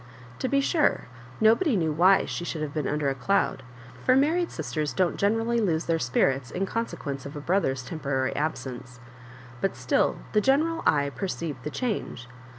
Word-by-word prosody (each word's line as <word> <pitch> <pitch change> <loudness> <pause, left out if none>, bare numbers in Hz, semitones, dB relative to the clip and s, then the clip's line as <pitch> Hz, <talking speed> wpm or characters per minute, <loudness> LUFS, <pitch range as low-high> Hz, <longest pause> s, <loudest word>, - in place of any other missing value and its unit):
To - - -1
be 275 +1 +2
sure, 300 +2 +1 0.3
nobody 225 - +4
kne^ 160 -3 0
why 185 +4 +5
she - - -4
should 160 -2 -3
have 145 -2 -4
been 150 -3 -1
under 150 -1 0
a - - 0
cloud, 135 +3 0 0.4
for 255 - +4
mar 280 +4 +4
ried 350 0 0
sisters 155 -2 -3
don't 185 -2 +1
generally 225 +3 +1
lose 165 -6 0
their 165 -1 +1
spirits 125 +1 +1
in 195 - -2
consetjaence 145 - -4
of 140 - -9
a - - -4
brother's 145 -6 0
temporary 140 -3 -2
absence; 130 -4 -4 0.6
but 195 - 0
still - - +1
the 210 - +3
general 315 +7 +2
eye 140 -2 +2
perceived 165 -6 -4
the 150 - -4
change. 195 - -3
165 Hz, 175 wpm, -26 LUFS, 140-225 Hz, 0.6 s, why